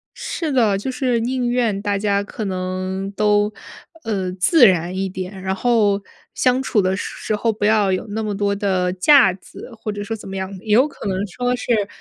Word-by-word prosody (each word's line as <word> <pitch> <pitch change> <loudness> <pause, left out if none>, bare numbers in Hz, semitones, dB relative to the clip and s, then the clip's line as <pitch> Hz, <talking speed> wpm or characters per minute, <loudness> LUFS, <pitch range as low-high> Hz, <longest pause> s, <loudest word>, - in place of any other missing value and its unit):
是 320 -4 -4
的， 220 -7 +3
就 260 +6 -4
是 250 -3 0
宁 245 +1 -1
愿 230 -5 0
大 205 -1 0
家 200 0 +1
可 210 +1 -6
能 185 +1 -3
都， 210 0 +2 0.5
呃， 190 -4 -2
自 235 - +5
然 180 0 +1
一 190 0 -2
点， 185 +1 -6
然 190 0 -2
后 210 -2 +2 0.4
相 255 0 +2
处 220 - +1
的 185 0 0
时 - - -5
时 215 - -2
候 225 +2 0
不 205 -1 -3
要 210 -3 +3
有 185 - -1
那 220 +2 -3
么 210 -2 -2
多 200 -1 0
的 185 -3 0
架 190 +1 +5
子， 195 +5 -12
或 215 -1 -5
者 205 0 -5
说 225 +2 -4
怎 205 - -10
么 195 - -6
样。 190 +1 -4
也 215 - -5
有 260 +6 +5
可 225 - -8
能 190 -1 -1
说 245 +6 -2
是 225 -4 0
205 Hz, 225 characters per minute, -20 LUFS, 190-230 Hz, 0.5 s, 自